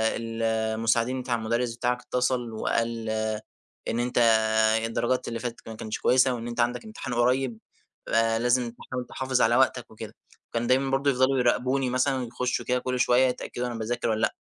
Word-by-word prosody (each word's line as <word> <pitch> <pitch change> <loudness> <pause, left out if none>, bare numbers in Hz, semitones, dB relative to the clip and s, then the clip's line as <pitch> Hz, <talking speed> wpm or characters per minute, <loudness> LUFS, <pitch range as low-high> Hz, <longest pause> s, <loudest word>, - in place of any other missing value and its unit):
ال 115 0 -4
المساعدين 115 +3 +1
بتاع 125 -1 -1
المدرس 115 +1 -1
بتاعك 125 +1 -1
اتصل 125 -1 -1
وقال 115 0 -1 0.8
إن 115 - -1
أنت 120 +1 -2 0.7
الدرجات 120 +2 -1
اللي 115 -1 -3
فاتت 120 0 -5
ك - - -20
ما 110 - -7
كانتش 110 0 -5
كويسة، 130 0 +4
وإن 120 -1 -5
أنت 120 0 -6
عندك 120 - 0
امتحان 175 - -6
قريّب، 125 0 +1 0.5
آآ، 115 0 +2
لازم 120 0 +1
تحاول 125 +1 -6
تحافظ 130 -1 -1
على - - +4
وقتك - - +1
وكده. - - -9 0.3
وكان 115 0 -2
دايمًا 135 +2 +2
برضو 135 +1 +2
يفضلوا 130 0 +2
يراقبوني 125 +2 +1
مثلًا، 130 +1 +1
يخشوا 120 +1 -2
كده 125 0 +1
كل 125 0 -2
شوية 125 +1 +4
يتأكدوا 125 0 -3
أنا 120 - -5
باذاكر 115 +1 -2
والّا 110 0 0
لأ، - - +1
120 Hz, 180 wpm, -26 LUFS, 115-130 Hz, 0.8 s, كويسة